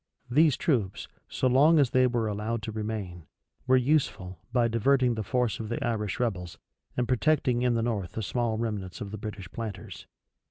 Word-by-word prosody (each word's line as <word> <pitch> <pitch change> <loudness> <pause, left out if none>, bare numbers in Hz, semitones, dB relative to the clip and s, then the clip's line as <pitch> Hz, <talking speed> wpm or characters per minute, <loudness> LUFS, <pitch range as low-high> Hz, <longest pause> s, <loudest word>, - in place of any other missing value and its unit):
These 150 +1 +4
troops, 110 - -1 0.2
so 130 - 0
long 145 +6 +5
as 140 -5 +3
they 130 0 +4
were 120 -2 0
allowed 105 +2 -3
to 110 - -4
remain, 105 -6 -5 0.4
were 130 0 +5
useful, 120 - 0
by 120 -1 +3
diverting 125 +2 +2
the 110 - -3
force 115 0 0
of 110 -1 -5
the 115 - -2
Irish 105 -4 -2
rebels, 95 -8 -2 0.4
and 125 -1 +1
protecting 130 -1 +2
in 125 -1 +2
the 115 - 0
north 105 -7 -2
the 110 - -3
small 115 +1 -1
remnants 105 -5 -4
of 100 -2 -6
the 110 - -6
British 100 -4 -7
planters. 110 -4 -7
115 Hz, 185 wpm, -28 LUFS, 105-125 Hz, 0.4 s, long